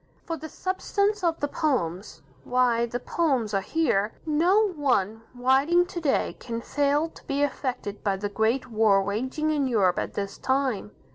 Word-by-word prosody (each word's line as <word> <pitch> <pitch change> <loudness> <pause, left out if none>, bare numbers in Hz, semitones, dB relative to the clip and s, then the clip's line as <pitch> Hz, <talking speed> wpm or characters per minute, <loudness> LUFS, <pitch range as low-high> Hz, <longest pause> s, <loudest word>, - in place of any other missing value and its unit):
For 330 - -3
the 315 0 -8
substance 400 +3 -1
of 335 -2 +1
the 290 - +1
poems 185 - -2 0.2
why, 240 - +2
the 240 +1 -4
poems 260 -8 0
are 195 - +2
here. 220 -5 0
No 355 +8 +3
one 245 - 0
writing 270 +8 +3
to 355 -1 -6
day 290 -4 0
can 230 -1 -4
fail 290 +5 +1
to - - -16
be 280 +1 0
affected 255 -7 -3
by 200 -2 0
the 205 +1 -2
great 220 +5 0
war 215 -3 +4
raging 260 +10 -1
in 290 -3 +1
Europe 200 -7 +2
at - - -4
this 200 -1 -4
time. 260 -6 0
260 Hz, 165 wpm, -26 LUFS, 215-310 Hz, 0.2 s, war